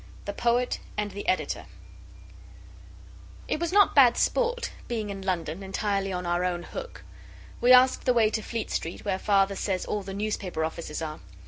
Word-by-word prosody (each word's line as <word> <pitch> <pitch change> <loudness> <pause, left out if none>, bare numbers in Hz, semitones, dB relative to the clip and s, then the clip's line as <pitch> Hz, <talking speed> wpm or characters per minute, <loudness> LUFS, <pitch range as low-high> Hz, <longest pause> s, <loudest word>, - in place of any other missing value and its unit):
THE 205 - -3
POET 240 +3 +1 0.2
AND 210 -1 -1
THE 205 - -7
EDITOR 185 - -1 1.8
It - - -1
was 340 0 -1
not 405 +1 +5
bad 255 -4 +6
sport 480 0 +1 0.2
being 220 -4 -3
in 195 -1 -6
London 180 -2 -2
entirely 195 0 -1
on 180 -1 -3
our 175 +1 0
own 175 -1 -1
hook. - - -8 0.6
We 245 +1 +5
asked 255 +1 +6
the 250 - +4
way 220 -2 +4
to 220 - -1
Fleet 230 0 -4
Street, 165 - -4
where 190 -2 0
Father 195 -1 +2
says 190 -2 -2
all 210 - -2
the 195 0 -7
newspaper 200 -6 -2
offices 160 0 -5
are. 155 -1 -5
200 Hz, 175 wpm, -27 LUFS, 185-240 Hz, 1.8 s, bad